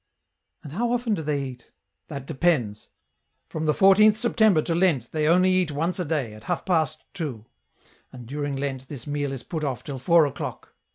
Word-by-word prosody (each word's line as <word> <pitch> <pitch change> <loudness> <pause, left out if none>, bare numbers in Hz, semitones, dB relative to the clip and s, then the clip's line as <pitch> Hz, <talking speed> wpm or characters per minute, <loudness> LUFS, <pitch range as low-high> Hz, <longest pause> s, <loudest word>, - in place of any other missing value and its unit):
" - - -50
And 145 - -9
how 235 +6 0
often 245 -2 0
do 190 - -1
they 145 -2 -1
eat? 125 -2 -9
" - - -56
" - - -55
That 140 -1 -7
depends. 135 -9 0 0.6
From 155 0 -3
the 150 - +4
14th 205 +4 +6
September 220 -7 +3
to 170 - -1
Lent 165 -9 +1
they 155 -1 0
only 185 +3 +4
eat 185 -3 +2
once 165 +6 -1
a 180 - -1
day, 145 -8 -2
at 110 +1 -13
half 175 +3 -2
past 160 -4 0
two 145 - -5 0.3
— - - -32
and 125 -2 -10
during 145 +2 -3
Lent 135 -1 -4
this 130 -4 -8
meal 145 -1 -2
is 135 -3 -6
put 160 -2 -4
off 135 -5 -3
till 135 -2 -6
four 170 +3 +5
o'clock. 140 - -6
155 Hz, 215 wpm, -25 LUFS, 135-180 Hz, 0.6 s, 14th